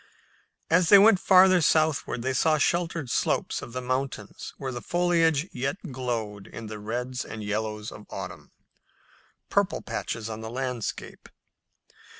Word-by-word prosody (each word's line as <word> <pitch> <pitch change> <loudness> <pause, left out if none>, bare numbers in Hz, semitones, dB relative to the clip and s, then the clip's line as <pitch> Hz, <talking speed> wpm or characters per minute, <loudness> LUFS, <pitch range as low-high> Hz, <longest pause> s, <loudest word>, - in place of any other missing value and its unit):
As 165 0 +4
they 200 - +10
went 205 -1 +6
farther 185 -1 +6
southward 155 -5 +1
they 130 +1 0
saw 155 +4 +3
sheltered 165 -1 0
slopes - - 0
of - - -9
the 130 +1 -5
mountains 130 -4 -4
where 135 -2 -4
the 120 -1 -6
foliage 170 -3 +2
yet 135 +6 -2
glowed 115 -6 -4
in 115 - -9
the 110 0 -7
reds 125 +4 -3
and 110 -1 -7
yellows 105 0 -3
of 105 - -12
autumn, - - -7 1.0
"purple - - +1
patches" 115 -2 -4
on 110 0 -6
the 110 - -6
landscape. 125 -2 -5
130 Hz, 145 wpm, -26 LUFS, 110-160 Hz, 1.0 s, they